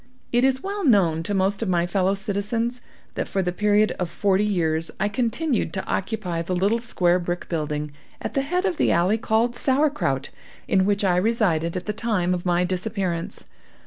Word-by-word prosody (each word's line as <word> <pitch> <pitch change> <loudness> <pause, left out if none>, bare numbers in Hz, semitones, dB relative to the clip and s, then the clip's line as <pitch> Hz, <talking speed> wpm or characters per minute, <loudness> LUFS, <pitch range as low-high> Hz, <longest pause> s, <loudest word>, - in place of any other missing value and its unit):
It 240 +1 +3
is 265 0 +2
well 400 +1 -3
known 185 - +3
to 200 +5 -2
most 195 +2 +1
of 220 - -1
my 175 -1 +2
fellow 190 +2 +1
citizens, 215 +4 -2 0.3
that - - -3
for 195 - -1
the 180 - -1
period 210 +3 +2
of 180 -2 -1
forty 195 +3 +1
years 165 -6 0
I 205 - +2
continued 245 +5 -1
to 190 - -3
occupy 185 -5 -2
the 180 +2 -2
little 200 +6 +2
square 180 -7 +1
brick 175 0 -4
building, 150 -2 -2 0.3
at - - -5
the 275 - +1
head 360 +7 -1
of 360 -5 0
the - - +2
alley 185 +6 +2
called 225 +2 +1
Sauerkraut, 265 - +1 0.4
in 190 -1 +3
which 205 0 +1
I 180 -2 +3
resided 180 -5 +1
at 180 - -5
the 210 - -2
time 205 -6 0
of 180 0 -3
my 175 0 +2
disappearance. 185 -2 -3
195 Hz, 190 wpm, -24 LUFS, 175-230 Hz, 0.4 s, It